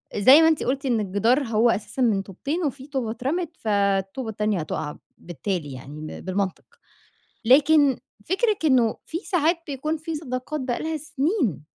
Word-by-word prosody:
زي 260 +10 +7
ما 320 - +6
أنتِ 320 -2 +2
قُلتِ 270 +2 -1
إن 240 -4 +1
الجدار 220 +8 +2
هو 230 0 +2
أساسًا 230 +4 -2
من 215 -5 +3
طوبتين 280 - -4
وفي 275 0 -4
طوبة 260 -6 -2
اترَمت 305 +8 -3
فالطوبة 200 +2 0
التانية 210 -3 -1
هتوقع 155 -1 -4 0.2
بالتالي 170 -2 -4
يعني 140 +4 -9
م 155 - -6
بالمنطق، 190 0 -3 0.8
لكن 285 +1 +5 0.3
فكرِك 410 0 0
إنّه 250 -7 +3
في 330 - -3
ساعات 345 -3 +1
بيكون 300 +3 -2
في 315 +1 -5
صداقات 290 0 -4
بقى 255 -2 -2
لها 320 0 -2
سنين، 280 - -1
255 Hz, 160 wpm, -24 LUFS, 200-305 Hz, 0.8 s, زي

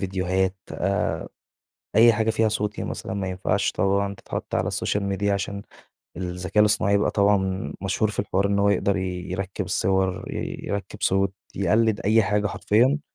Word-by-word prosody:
ڤيديوهات، 95 0 0 0.2
آآ 100 +3 -1 0.7
أي 115 +1 +8
حاجة 110 +1 +1
فيها 110 0 +2
صوتي 105 -1 -2
مثلًا، - - -5
ما 95 -2 -2
ينفعش 95 0 0
طبعًا 100 0 +1
تِتحَطّ - - -6
على - - 0
السوشيال 105 -1 -1
ميديا 100 +1 0
عشان 100 0 -3 0.5
الذَّكاء 90 +3 -1
الاصطناعي 105 -1 +4
بقى 105 - +1
طبعًا 100 -1 +1
مشهور 100 +2 0
في 105 - -9
الحوار 95 +1 +1
إنّه 100 0 +1
هو 100 - +4
يقدر 100 0 +2
يِرَكِّب 95 0 -3
الصور، 95 -1 0 0.4
يِرَكَّب 100 -2 -4
صوت، 95 0 +2 0.2
يقلِّد 110 +2 +2
أي 110 +3 +4
حاجة 105 +1 +1
حرفيًا. 125 +9 +2
100 Hz, 150 wpm, -24 LUFS, 95-105 Hz, 0.7 s, أي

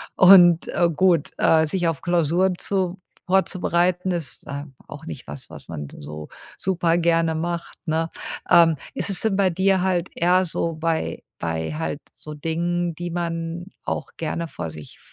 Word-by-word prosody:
Und, 180 -3 +7
äh, 175 -1 +2
gut, 175 -4 +3
äh, 160 -1 +4
sich 175 +1 0
auf 165 -4 -1
Klausuren 175 +1 +2
vor 190 -2 -1 0.3
vorzubereiten 180 -1 +1
ist 165 -6 -4
ähm 140 0 -7
auch - - -10
nicht - - -7
was, 70 -1 -9
was - - -12
man 75 -3 -5
so 75 +1 -8 0.3
super 175 -3 +1
gerne 165 -1 +2
macht, 170 +1 -3
ne? 160 +1 0 0.4
Ähm, 165 -2 +6 0.2
ist - - -3
es 190 - -1
denn 220 -3 +1
bei 195 -2 +3
dir 190 +1 +2
halt 185 -2 0
eher 180 +2 +3
so 165 0 -2
bei 160 0 -2 0.2
bei 80 - -2
halt 155 -1 -3
so 150 - -9
Dingen, 170 +2 -1
die 175 +1 -5
man 170 0 -3 0.2
auch 150 - -4
gerne 165 +1 -3
vor 80 - -6
sich 75 -3 -11
170 Hz, 165 wpm, -23 LUFS, 160-180 Hz, 0.4 s, Und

